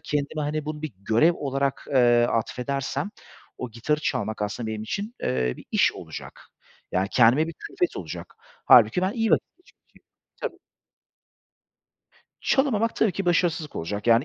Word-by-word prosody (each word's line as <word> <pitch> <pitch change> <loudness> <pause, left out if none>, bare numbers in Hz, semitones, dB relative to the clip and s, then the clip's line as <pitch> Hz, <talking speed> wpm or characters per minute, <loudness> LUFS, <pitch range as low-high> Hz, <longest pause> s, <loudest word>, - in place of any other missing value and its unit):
kendime, 150 0 -2
hani, 150 +1 -2
bunu 150 0 -5
bir 155 -6 -4
görev 115 - +3
olarak, 140 -2 -2
eee, 120 -2 +5
atfedersem, 130 - -2 0.5
o 125 - -5
gitarı 135 +7 -1
çalmak 110 -7 -2
aslında 105 +3 -3
benim 110 -1 -4
için, 205 - -4
eee, 65 -1 0
bir - - -12
iş - - +3
olacak. - - -9 0.5
Yani, 95 +2 +1
kendime 125 +6 +5
bir - - -5
külfet 355 - -3
olacak. - - -7 0.3
Hâlbuki 180 - +6
ben 190 +2 +1
iyi 225 -2 0
vaki - - +4 0.2
geçi 360 - -24
ki. - - -27 0.4
Tabii. - - -4 1.8
Çalamamak 230 -5 +2
tabii 215 -5 +2
ki 195 +2 -4
başarısızlık 170 -3 +1
olacak. 100 +7 -4
Yani, 115 +3 +5
140 Hz, 150 wpm, -25 LUFS, 115-170 Hz, 1.8 s, Hâlbuki